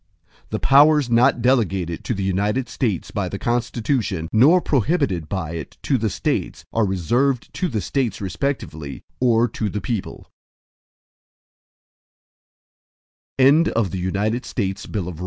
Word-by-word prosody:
X - - -36
The - - -2
powers 145 -1 +5
not 120 +1 +3
delegated 95 -10 +1
to 120 - -1
the 100 - -3
United 105 +7 0
States 105 -10 -2
by 100 -3 -2
the 100 - -5
Constitution, 115 - -1
nor 140 +11 +6
prohibited 120 - 0
by 95 -5 -3
it 80 -4 -7
to 135 - +1
the 110 0 0
States, - - -2
are 115 -2 +2
reserved 120 - 0
to 185 - -1
the 110 - -2
States 130 +4 -1
respectively, 95 - -4 0.2
or 120 -1 +3
to 105 0 -3
the 105 - -3
people. 110 -3 -4
115 Hz, 115 wpm, -21 LUFS, 95-130 Hz, 0.2 s, nor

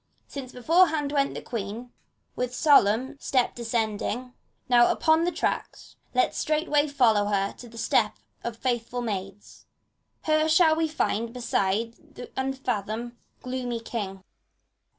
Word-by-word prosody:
since 265 -3 -8
beforehand 310 +2 +3
went 280 -1 +1
the - - -6
Queen, 230 +1 -5 0.4
With 250 0 -3
solemn 265 -2 +4
step 255 -3 +1
descending. 235 +1 -2 0.3
Now, 240 -1 +5
upon 320 +1 +3
the 355 - +1
track, - - -2 0.4
Let - - +3
straightway 305 -1 +1
follow 230 -8 +3
her 200 -1 0
the 235 -1 -12
step 225 -1 +2 0.3
of 235 -1 -4
faithful 245 0 -2
maids 195 -2 -6 0.6
t 310 - 0
Her 310 0 +3
shall 315 0 +5
we 320 0 +1
find 235 -7 -1
beside 230 -2 -2
the 245 - -9
unf 265 0 -2
athomed, 225 +1 -2 0.3
gloomy 250 -2 -3
King. 200 -5 -5
245 Hz, 130 wpm, -26 LUFS, 225-285 Hz, 0.6 s, Now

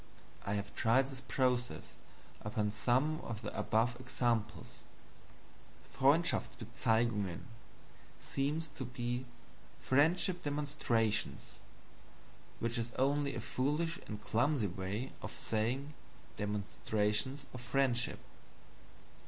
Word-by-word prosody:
I 100 - +1
have 100 0 -3
tried 130 +4 +3
this 130 -1 -6
process 125 -2 0 0.5
upon 105 -1 0
some 130 +9 +2
of 115 -1 -5
the 105 - -4
above 115 +3 +2
examples. 120 -4 -1 1.2
"Freundshaftsbezeigungen" 120 - +2 0.8
seems 150 +4 -1
to 135 - -6
be 120 0 -3 0.5
"Friendship 175 +6 +3
demonstrations," 120 - 0 1.0
which 115 +1 -1
is 115 +1 -2
only 140 +1 +2
a - - -2
foolish 150 +6 0
and 105 -1 -5
clumsy 120 +3 +2
way 95 +7 -3
of - - -5
saying 125 +7 -1 0.4
"demonstrations 105 +5 0
of 125 - -6
friendship." 125 0 +1
120 Hz, 95 wpm, -35 LUFS, 110-140 Hz, 1.2 s, tried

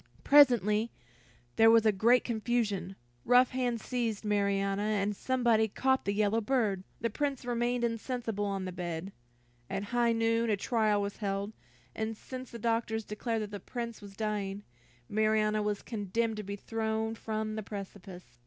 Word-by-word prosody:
Presently 235 -6 +5 0.7
there 225 0 +7
was 225 -1 +6
a 215 - +6
great 230 +5 +4
confusion, 220 -5 -1 0.3
rough 250 +1 +5
hands 245 -3 -1
seized 230 -4 -2
Marianna, 200 -1 +1
and 210 -1 0
somebody 235 -2 +2
caught 265 +5 +1
the 200 - +1
yellow 210 +2 +2
bird. 215 -5 0 0.2
The 230 - 0
Prince 280 -4 -2
remained 240 0 0
insensible 230 -2 -2
on 195 -2 -2
the 185 - -4
bed. 175 +1 -5 0.6
At 195 - -2
high 240 -1 +3
noon, 230 0 +1
a 210 - +2
trial 215 -1 +1
was 200 0 -4
held, 200 0 -2 0.4
and 220 0 -3
since 255 +1 -8
the 235 - -8
doctors 225 -1 -1
declared 220 +1 -2
that 210 - -7
the 205 - -5
Prince 235 -1 -6
was 200 -1 -11
dying, 205 -2 -2 0.4
Marianna 215 +1 +2
was 210 -1 -2
condemned 225 +1 -2
to 210 - -4
be 200 +1 -5
thrown 220 +1 -2
from 215 -1 -3
the 215 - -3
precipice. 190 - -9
220 Hz, 160 wpm, -31 LUFS, 205-235 Hz, 0.7 s, there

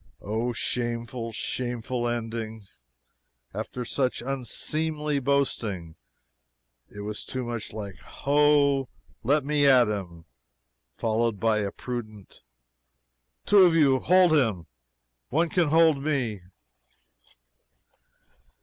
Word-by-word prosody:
Oh, 110 +4 -1
shameful, 120 0 -3
shameful 120 +1 -3
ending, 115 -2 -4 0.9
after 125 -1 -5
such 125 -1 -1
unseemly 150 +3 -1
boasting! 115 - -1 0.9
It 105 - -9
was 105 +1 -5
too 130 -1 -4
much 120 -2 -5
like 100 -4 -7
"Ho! 140 -2 +2 0.3
let 140 +4 +2
me 145 -1 +3
at 125 -4 +6
him!" 90 -6 -5 0.7
followed 115 -1 0
by 110 0 +2
a 100 -1 -1
prudent 110 -5 -7 1.0
"Two 205 - +5
of 180 -3 +6
you 140 -5 +4
hold 180 +1 +4
him 110 - +1 0.6
one 165 +5 +1
can 175 -2 +2
hold 160 -2 +4
me!" 130 -9 -1
125 Hz, 100 wpm, -26 LUFS, 110-145 Hz, 1.0 s, at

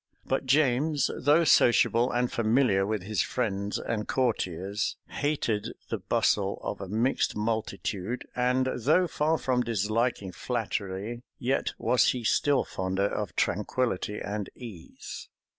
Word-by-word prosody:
But 135 0 -1
James, 145 +1 +2
though 150 +5 +4
sociable 120 -4 +4
and 120 0 0
familiar 110 -4 +2
with 105 -3 -2
his 100 -2 0
friends 100 -4 -2
and 105 -2 -3
courtiers, 100 -5 -1
hated 140 -8 -1 0.2
the - - -2
bustle 100 -1 +1
of 100 - -4
a 95 - -5
mixed 115 +7 0
multitude; 110 0 -2
and 125 +1 +2
though 155 +10 +3
far 160 -1 +1
from 125 -2 0
disliking 110 -2 0
flattery, 110 0 -3 0.2
yet 130 +3 0
was 125 - +3
he 125 -2 -5
still 140 +4 +2
fonder 95 +1 -2
of 100 -4 -3
tranquillity 105 +1 -1
and 105 -1 -4
ease. 105 -10 -9
115 Hz, 125 wpm, -28 LUFS, 100-130 Hz, 0.2 s, though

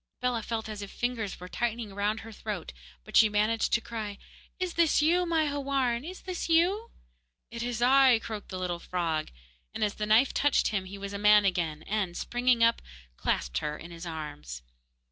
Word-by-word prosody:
Bellah 250 -2 0
felt 225 0 -3
as 215 -1 -6
if 200 - -6
fingers 235 -5 -3
were 180 - -8
tightening 230 0 -3
round 205 +2 -1
her 225 - -10
throat, 205 - -5 0.3
but - - -10
she 220 - +7
managed 215 +2 +1
to 235 - +3
cry: 220 -3 -5 0.4
'Is 365 -2 -2
this 335 -2 +3
you, 345 +4 +3
my 325 -2 +2
Houarn? 275 -4 0
Is 365 +4 -8
this 365 -2 -4
you?' 370 +8 +3 0.6
'It 235 0 -5
is 240 -1 -2
I,' 260 -1 +6
croaked 220 -2 -7
the 185 - -5
little 180 -2 -2
frog; 165 -4 -2 0.5
and - - -1
as 205 -1 +1
the 210 - -3
knife 225 +5 +4
touched 290 -1 +2
him 195 -3 -2
he 195 +2 -8
was 200 0 -6
a 200 - -4
man 210 0 +6
again, 165 -5 0
and, 200 -5 -2
springing 245 -1 +2
up, 230 0 +4
he - - -19
clasped - - -1
her 150 0 -3
in 170 - -10
his 170 +1 -8
arms. 150 - -7
215 Hz, 200 wpm, -29 LUFS, 185-250 Hz, 0.6 s, she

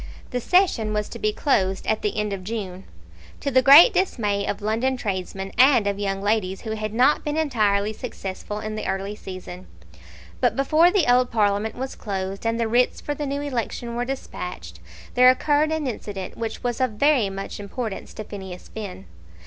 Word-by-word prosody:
The 250 - -2
session 290 - +2
was 210 0 -1
to - - -8
be 215 - +1
closed 195 -6 0
at 220 - 0
the 210 - -2
end 210 -1 -1
of 190 -1 -5
June, 195 -3 -5 0.5
to 280 - -2
the 260 0 +5
great 285 - +9
dismay 205 - 0
of 200 - -2
London 235 +5 0
tradesmen 195 -3 -4
and 255 -4 +6
of 200 0 -1
young 195 -1 -2
ladies 205 -3 0
who 220 - -5
had 215 -1 -3
not 255 +6 +3
been 295 +1 -2
entirely 215 -8 +1
successful 210 -3 -6
in 215 0 -5
the 215 - -4
early 195 +1 -2
season. 185 -2 -9 0.7
But - - +2
before 310 +5 +4
the 380 -3 +2
old 250 0 +4
Parliament 210 -1 +1
was 260 +1 -5
closed, 195 0 -4
and 230 +1 0
the 230 - +1
writs 245 +2 +2
for 290 - -3
the 290 0 -4
new 280 +1 -2
election 240 -3 -3
were 240 - -1
despatched, 180 - -6 0.3
there 250 0 +7
occurred 295 +4 +2
an 315 -2 -1
incident 205 -6 -5
which 225 -1 -5
was 245 0 -2
of 255 -4 +1
very 255 -2 +3
much 195 +1 -6
importance 205 +1 -5
to 215 - -5
Phineas 190 -3 -9
Finn. 195 - -7
220 Hz, 190 wpm, -23 LUFS, 200-255 Hz, 0.7 s, great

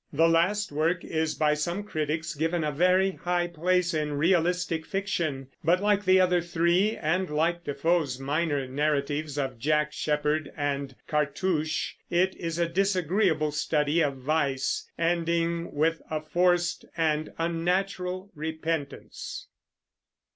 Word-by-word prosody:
The 160 +3 +4
last 175 +5 +2
work 165 +4 0
is 160 -1 -1
by 150 -1 +2
some 170 +6 -2
critics 160 -3 -2
given 165 +2 -1
a 150 - 0
very 185 +5 +3
high 175 -1 -1
place 175 +1 +1
in 150 -1 -1
realistic 170 +1 +1
fiction, 160 -8 -2
but 175 +3 +3
like 205 0 +2
the 185 0 +6
other 180 -1 +3
three, 175 +5 +1
and 180 +4 0
like 165 +3 0
Defoe's 145 -1 0
minor 145 0 -1
narratives 145 +1 -1
of 135 -4 -2
Jack 150 +3 +1
Sheppard 150 0 0
and 140 -2 -2
Cartouche, 155 +1 0 0.2
it 185 +2 +2
is 165 -1 -4
a 170 -1 +1
disagreeable 180 -3 +1
study 150 +1 +1
of 140 -3 +1
vice, 140 -1 -1
ending 170 0 0
with 160 +3 +1
a 155 - -1
forced 175 +2 +1
and 155 -1 0
unnatural 180 +3 -1
repentance. 160 -1 -4
165 Hz, 130 wpm, -27 LUFS, 150-175 Hz, 0.2 s, the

